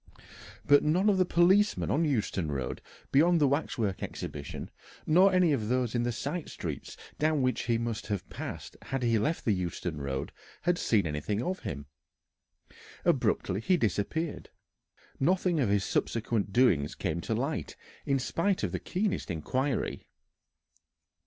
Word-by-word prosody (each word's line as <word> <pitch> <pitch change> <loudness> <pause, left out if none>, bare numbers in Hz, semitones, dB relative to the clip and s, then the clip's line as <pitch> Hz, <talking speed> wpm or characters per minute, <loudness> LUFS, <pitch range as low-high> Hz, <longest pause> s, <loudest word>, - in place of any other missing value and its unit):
But 145 0 +6
none 180 +7 +3
of 190 - +1
the 185 - +4
policemen 190 +5 +3
on 165 +3 +2
Euston 105 - -1
Road 70 -3 -3 0.3
beyond 170 +5 +5
the 145 - +4
Waxwork 120 -8 -1
Exhibition, 70 -1 -6 0.3
nor 185 +5 +5
any 180 -4 +4
of 110 -6 -1
those 125 -2 +1
in 120 - +1
the 120 0 0
side 145 +7 -4
streets - - -6 0.2
down 155 -2 +2
which 130 0 0
he 115 -1 +2
must 115 -3 -3
have 100 -4 -3
passed - - -7
had 135 -1 -3
he 115 -2 +3
left 155 +10 -1
the 110 - +3
Euston 90 -4 -3
Road, 70 0 -3 0.3
had 175 0 +2
seen 105 -5 +2
anything 80 +9 -2
of 185 +1 -2
him. 70 0 -5 1.2
Abruptly 95 - +1
he 180 +10 +3
disappeared. 130 - -2 0.7
Nothing 175 +2 +2
of 125 -7 +2
his 100 -1 +2
subsequent 110 -3 -1
doings 90 - +3
came 85 -3 -2
to 110 - -2
light 135 +7 -2 0.3
in 140 -1 +1
spite 175 +8 0
of - - 0
the - - -2
keenest 195 - -2
inquiry. 130 - -2
125 Hz, 150 wpm, -29 LUFS, 100-160 Hz, 1.2 s, But